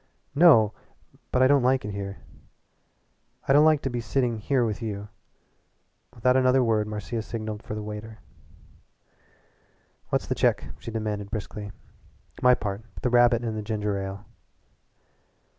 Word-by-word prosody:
"No, 140 Hz, -10 st, +6 dB, 0.6 s
but 130 Hz, -, +3 dB
I -, -, +6 dB
don't 140 Hz, 0 st, +4 dB
like 130 Hz, -1 st, +2 dB
it 105 Hz, -, -4 dB
here. 100 Hz, 0 st, -5 dB, 1.3 s
I 135 Hz, -, +4 dB
don't 150 Hz, +2 st, +6 dB
like 155 Hz, -2 st, +4 dB
to 135 Hz, -, -1 dB
be 120 Hz, -1 st, -2 dB
sitting 120 Hz, -2 st, -1 dB
here 125 Hz, +2 st, +1 dB
with 110 Hz, +1 st, -3 dB
you." 105 Hz, -2 st, -5 dB, 1.1 s
Without 125 Hz, +2 st, +2 dB
another 130 Hz, 0 st, +4 dB
word 110 Hz, -2 st, +1 dB
Marcia 105 Hz, +2 st, -4 dB
signalled 110 Hz, -1 st, -5 dB
for 105 Hz, -, -6 dB
the 105 Hz, -, -5 dB
waiter. 105 Hz, +1 st, -7 dB, 1.9 s
"What's -, -, 0 dB
the -, -, -1 dB
check?" -, -, +1 dB
she -, -, -8 dB
demanded 105 Hz, -2 st, -3 dB
briskly 105 Hz, -1 st, -6 dB, 0.7 s
"My 125 Hz, 0 st, +6 dB
part 100 Hz, 0 st, -4 dB, 0.2 s
the 125 Hz, -, +1 dB
rabbit 120 Hz, -1 st, +4 dB
and 115 Hz, -2 st, -3 dB
the 110 Hz, -, -3 dB
ginger 105 Hz, -1 st, -2 dB
ale." 95 Hz, 0 st, -5 dB
110 Hz, 145 wpm, -26 LUFS, 105-125 Hz, 1.9 s, No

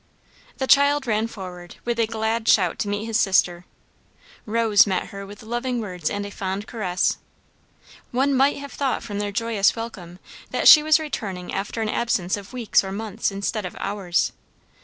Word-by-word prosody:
The 265 Hz, -, -1 dB
child 285 Hz, +1 st, +4 dB
ran 220 Hz, -1 st, 0 dB
forward 180 Hz, -5 st, -9 dB
with 240 Hz, -1 st, -1 dB
a 225 Hz, -, +2 dB
glad 225 Hz, 0 st, -2 dB
shout 180 Hz, -5 st, +3 dB
to -, -, -1 dB
meet 205 Hz, +1 st, -2 dB
his 225 Hz, 0 st, 0 dB
sister, 180 Hz, -3 st, +2 dB, 0.8 s
Rose 220 Hz, -2 st, +4 dB
met 190 Hz, -2 st, -1 dB
her 200 Hz, 0 st, -8 dB
with 205 Hz, +2 st, -12 dB
loving 240 Hz, +2 st, -2 dB
words 180 Hz, -7 st, -3 dB
and 205 Hz, 0 st, -3 dB
a 205 Hz, -, -7 dB
fond 195 Hz, +1 st, -4 dB
caress; 185 Hz, -7 st, -1 dB, 0.9 s
one 270 Hz, +3 st, +1 dB
might 270 Hz, +2 st, +3 dB
have 280 Hz, 0 st, -8 dB
thought 275 Hz, -2 st, -1 dB
from 205 Hz, -2 st, -5 dB
their 205 Hz, 0 st, -2 dB
joyous 220 Hz, -1 st, +1 dB
welcome, 195 Hz, -7 st, -7 dB, 0.3 s
that -, -, +1 dB
she 305 Hz, -, +11 dB
was 310 Hz, +1 st, +4 dB
returning 200 Hz, -, -5 dB
after 205 Hz, +3 st, -3 dB
an 215 Hz, -, -2 dB
absence 195 Hz, -6 st, 0 dB
of 200 Hz, -1 st, -10 dB
weeks 240 Hz, -6 st, +2 dB
or 190 Hz, -, -5 dB
months 215 Hz, +1 st, -2 dB
instead 200 Hz, +2 st, -3 dB
of 180 Hz, -, -6 dB
hours. 195 Hz, -4 st, -1 dB
215 Hz, 180 wpm, -23 LUFS, 195-235 Hz, 0.9 s, she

